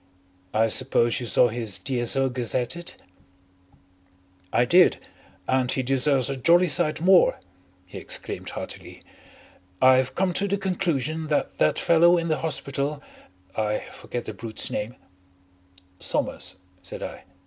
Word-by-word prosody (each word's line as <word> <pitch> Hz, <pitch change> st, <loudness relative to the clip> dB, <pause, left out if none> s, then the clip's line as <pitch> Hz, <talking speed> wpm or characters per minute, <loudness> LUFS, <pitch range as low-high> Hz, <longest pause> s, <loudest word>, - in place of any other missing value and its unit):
I 110 Hz, +1 st, +2 dB
suppose 120 Hz, 0 st, +1 dB
you 120 Hz, -, -5 dB
saw 120 Hz, +4 st, +4 dB
his 110 Hz, -3 st, -2 dB
D.S.O. 135 Hz, 0 st, +1 dB
gazetted?" 125 Hz, +7 st, -2 dB, 1.6 s
"I 120 Hz, -, +3 dB
did. 175 Hz, +7 st, +5 dB, 0.5 s
And 130 Hz, -1 st, +1 dB
he 130 Hz, -, 0 dB
deserves 135 Hz, 0 st, +1 dB
a 135 Hz, -, -2 dB
jolly 170 Hz, +7 st, +4 dB
sight 155 Hz, +1 st, +2 dB
more," 185 Hz, 0 st, +5 dB, 0.5 s
he 90 Hz, -, -9 dB
exclaimed -, -, -4 dB
heartily. -, -, -8 dB, 0.8 s
"I've 130 Hz, 0 st, +4 dB
come 185 Hz, -1 st, 0 dB
to 200 Hz, +3 st, +1 dB
the 200 Hz, +1 st, 0 dB
conclusion 160 Hz, -5 st, -2 dB
that 150 Hz, -, -1 dB
that 75 Hz, -, +2 dB
fellow 170 Hz, +1 st, +4 dB
in 170 Hz, -1 st, -2 dB
the 155 Hz, -, 0 dB
hospital 140 Hz, -1 st, -3 dB, 0.5 s
I 105 Hz, -1 st, -1 dB
forget 120 Hz, -, -6 dB
the 110 Hz, -, -6 dB
brute's 110 Hz, +1 st, -4 dB
name 110 Hz, +4 st, -4 dB, 0.6 s
" 90 Hz, 0 st, -29 dB
"Somers," 95 Hz, -, -3 dB, 0.3 s
said -, -, -8 dB
I. -, -, -8 dB
130 Hz, 135 wpm, -24 LUFS, 115-160 Hz, 1.6 s, did